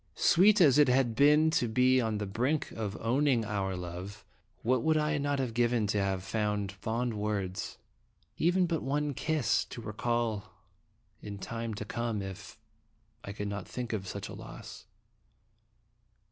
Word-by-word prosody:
Sweet 205 +4 +5
as 150 -4 +6
it 145 - +6
had 125 -2 +3
been 150 +5 +5
to 125 - +1
be 125 +3 +3
on 110 -2 -1
the 105 - -3
brink 125 +10 -1
of 105 -2 -4
owning 125 0 +2
our 100 -2 -2
love, 90 +3 -7 0.4
what 125 +1 +2
would 160 +3 +2
I 150 0 +1
not 145 0 0
have 130 -4 -2
given 120 -1 +2
now - - 0
to 105 - +1
have 95 -1 -1
some 105 -1 -1
fond 115 +4 -2
words? 105 -3 -3 0.6
even 180 +3 +2
but 165 -2 -1
one 145 +2 -1
kiss, 155 0 +1
to - - -9
re 110 -2 -6
call 110 -4 -2 0.7
in 100 -1 -7
time 115 +2 -5
to 105 - -5
come 115 -2 -2
if 95 +1 -8 0.7
I 100 - -6
could 105 0 -4
not 100 -2 -5
think 120 -2 -5
of 95 -3 -3
such - - -5
a - - -9
loss. - - -10
115 Hz, 170 wpm, -30 LUFS, 105-135 Hz, 0.7 s, as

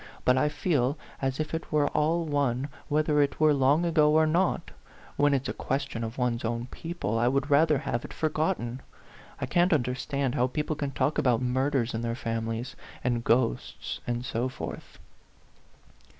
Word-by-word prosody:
But 125 - +5
I 150 +3 +2
feel 145 -2 0 0.2
as 135 0 -1
if 155 0 -3
it 160 - -4
were 150 -2 +3
all 165 +3 +1
one 140 -3 0 0.2
whether 150 -1 +2
it 140 -1 0
were 155 -1 +5
long 140 +5 +3
ago 155 -3 +4
or 160 0 +5
not; 170 +4 +1 0.4
when 145 -1 +3
it's 135 0 -1
a - - -2
question 135 -3 -3
of 115 +1 -5
one's 125 -2 0
own 115 +1 -2
people, 165 -10 -3
I 120 - +3
would 140 +3 0
rather 150 +1 +5
have 120 -4 -2
it - - -8
forgotten. 155 -6 -1 0.6
I - - -1
can't 175 +2 +2
understand 135 -1 0
how 125 -3 +2
people 150 +4 -2
can 145 -2 -2
talk 135 +2 0
about 120 -3 +3
murders 130 -1 0
in 115 - -2
their 115 0 -2
families, 115 0 -3 0.3
and 120 -1 0
ghosts, 115 - 0
and 120 0 -2
so 125 0 -1
forth." 130 - -8
135 Hz, 175 wpm, -28 LUFS, 120-150 Hz, 0.6 s, But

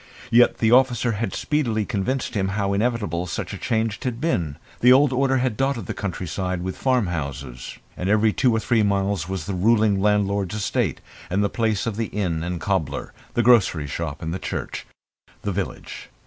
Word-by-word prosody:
Yet 120 +1 +5
the 110 -1 +2
officer 125 -2 +4
had 110 -2 -2
speedily 115 -8 0
convinced 125 +4 -2
him 95 -3 0
how 100 -1 0
inevitable 105 -6 -1
such 80 - -4
a - - -5
change 110 -1 -1
had 125 -2 -2
been. 85 - -1 0.2
The 125 - +6
old 135 +1 +5
order 135 +1 +2
had 125 -3 0
dotted 135 -4 -1
the - - -4
country 95 -2 -4 0.3
with 90 +1 -4
farmhouses, 75 - -2 0.2
and 90 - -3
every 105 +1 +3
two 125 - +3
or - - +2
three 115 0 +2
miles 100 -4 0
was 95 -4 -3
the 100 - -3
ruling 105 +1 +3
landlord's 100 -1 +1
estate, 105 - -1 0.3
and 100 +3 +1
the 100 - +1
place 110 -4 0
of 110 -3 -3
the 115 -1 -1
inn 90 -6 -2
and 90 0 -3
cobbler, 80 -8 -2 0.2
the 120 - +3
grocer's 95 - +4
shop 80 -1 -4
and 85 +4 -3
church - - -5 0.6
the 105 - -1
village. 95 -1 -5
105 Hz, 180 wpm, -23 LUFS, 90-115 Hz, 0.6 s, The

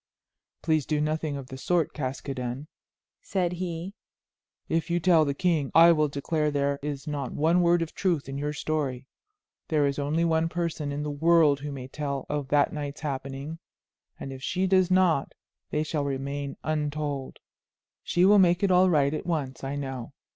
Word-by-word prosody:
"Please 155 -4 +1
do 150 -1 +1
nothing 155 -1 -1
of 135 - -7
the 130 - -8
sort, 175 +2 +1
Caskoden," 130 -1 -4 0.6
said 180 -3 -1
he; 175 +1 -4 0.7
"if 165 +1 -1
you 170 0 +1
tell 165 -2 +4
the 140 -1 -1
king 160 -5 +1
I 165 +1 +9
will 155 -2 +3
declare 150 +2 -1
there 140 -1 0
is 145 -1 -4
not 145 -4 -4
one 165 +4 +3
word 170 0 +3
of 160 - -8
truth 170 -7 0
in 135 - -5
your 145 +1 -2
story. 145 -4 -2 0.6
There 150 -3 +2
is 140 0 -1
only 155 +4 +1
one 165 0 +2
person 165 -4 -2
in 145 +1 -3
the 150 - -3
world 155 -1 +4
who 145 +1 -5
may 130 -2 -7
tell 140 -1 -4
of 145 -2 -2
that 145 +1 +2
night's 145 -1 -5
happenings, 140 +2 -5 0.6
and 135 - -6
if 130 - -9
she 185 +7 0
does 185 -1 +3
not 185 -6 +2 0.3
they 150 - 0
shall 155 -1 -2
remain 140 0 -3
untold. 150 -2 -2 0.6
She 175 +1 +2
will 205 +1 +7
make 175 0 +4
it 195 - +3
all 185 +1 +5
right 145 -4 +3
at 155 - -4
once, 140 -7 -2
I 135 +1 -3
know. 135 -3 -5
150 Hz, 180 wpm, -27 LUFS, 140-165 Hz, 0.7 s, I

